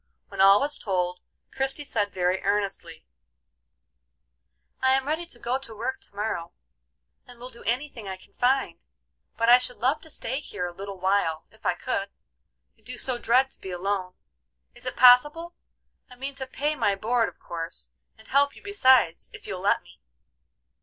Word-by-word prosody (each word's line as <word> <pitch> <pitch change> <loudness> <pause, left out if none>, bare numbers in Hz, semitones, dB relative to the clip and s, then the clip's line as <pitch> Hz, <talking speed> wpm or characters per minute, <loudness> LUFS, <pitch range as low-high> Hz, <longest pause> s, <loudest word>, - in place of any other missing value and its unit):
When - - -2
all 195 +1 +8
was 290 +1 0
told, 180 -4 -1 0.3
Christie 270 +2 -1
said 205 -6 0
very 185 0 0
earnestly: 195 -5 -2 1.8
"I 260 0 +4
am 265 0 +1
ready 320 +3 -2
to 265 - -6
go 245 +2 -1
to 230 -5 -9
work 260 +5 -3
to - - -10
morrow, 200 -5 -3 0.7
and 245 -1 -13
will 250 +2 -9
do 235 - -12
any 250 +6 0
thing 230 -7 -11
I 190 -1 -5
can - - -21
find, 265 +2 +1 0.6
but 230 - +1
I 245 +1 +9
should 250 0 -5
love 260 +7 +1
to 320 - -15
stay 265 -2 -2
here 205 -10 -5
a 175 - -5
little 195 +1 -8
while, 185 -4 +1
if - - -7
I - - +2
could; - - -2 0.7
I - - -28
do 250 0 -6
so 245 0 -1
dread 260 +4 +3
to - - -14
be 190 - -7
alone. 185 0 -2 0.6
Is - - -10
it - - -3
possible? 295 +7 +6 0.6
I 250 - -13
mean 270 +3 -5
to 270 -1 -4
pay 295 +3 -1
my 205 -8 +1
board 230 +3 +1
of - - -20
course, 165 0 -6 0.3
and 220 - -18
help 280 +1 +3
you - - -15
besides 260 - +3
if - - -11
you'll 185 - -5
let 200 - +2
me." - - -18
235 Hz, 185 wpm, -26 LUFS, 195-265 Hz, 1.8 s, I